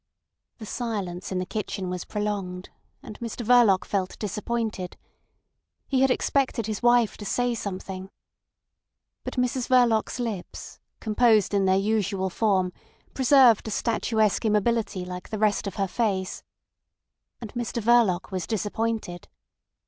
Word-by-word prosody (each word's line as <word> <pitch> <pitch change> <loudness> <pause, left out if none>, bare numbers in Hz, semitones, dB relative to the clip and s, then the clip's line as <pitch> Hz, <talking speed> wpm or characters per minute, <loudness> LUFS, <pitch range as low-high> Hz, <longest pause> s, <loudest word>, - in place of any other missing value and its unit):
The 220 - -9
silence 200 -7 -4
in 185 - -1
the 185 - -1
kitchen 195 -2 -4
was 180 0 -4
prolonged, 195 -3 -4 0.3
and 210 - -10
Mr 235 0 -5
Verloc 215 -6 +5
felt 190 -2 -2
disappointed. 210 -2 -3 0.9
He 265 -2 +1
had 270 - +4
expected 255 -3 0
his 215 -1 -4
wife 240 -2 +3
to - - -8
say 245 +4 0
something. 190 -3 -6 1.1
But - - -5
Mrs 250 0 0
Verloc's 245 -2 +3
lips, 220 -7 -5 0.2
composed 220 -1 +3
in 200 -1 +2
their 190 0 +4
usual 195 -2 0
form, 190 -4 +1 0.4
preserved 260 -4 +5
a - - -2
statuesque 220 -1 +1
immobility 215 -3 0
like 180 0 -7
the 215 - -3
rest 210 -1 +1
of 195 - -5
her 195 -1 0
face. 190 -3 -1 1.0
And 225 -3 -8
Mr 240 -1 -3
Verloc 220 -5 +3
was 185 -2 -3
disappointed. 220 -3 -2
215 Hz, 135 wpm, -26 LUFS, 190-235 Hz, 1.1 s, Verloc